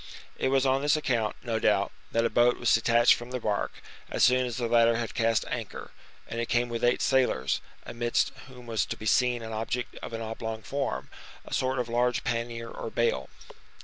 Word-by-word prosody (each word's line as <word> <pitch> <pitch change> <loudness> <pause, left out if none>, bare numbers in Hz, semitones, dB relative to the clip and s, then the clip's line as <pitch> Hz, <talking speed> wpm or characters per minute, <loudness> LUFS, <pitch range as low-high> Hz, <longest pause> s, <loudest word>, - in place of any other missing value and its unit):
It - - -1
was 135 0 +2
on 135 +1 +2
this 145 +2 +3
account, 120 -8 0
no 115 -2 -1
doubt, - - +2 0.2
that 115 0 +2
a - - +2
boat 120 +1 +4
was - - +2
detached 120 0 +5
from 120 +1 -6
the 125 0 -3
bark, 105 -3 -1 0.4
as - - +1
soon 125 0 +4
as 120 - -5
the 120 -2 -1
latter 115 0 +4
had 115 -1 -3
cast 115 -1 +1
anchor, - - -5 0.4
and 115 0 -3
came 120 0 +1
with 115 -1 -4
eight 120 0 +3
sailors, 125 - +2 0.2
amidst 120 0 0 0.2
whom 125 -2 -13
was 115 -2 0
to - - -4
be 110 - -9
seen 125 +1 +2
an 110 0 -6
object 120 +3 -3
of - - -7
an 115 - -4
oblong 110 0 -5
form, 135 - -3 0.3
a - - -8
sort 130 0 0
of 125 -1 -1
large 120 +1 +1
pannier 115 0 -3
or - - -6
bale. 90 - 0
120 Hz, 205 wpm, -28 LUFS, 115-125 Hz, 0.4 s, detached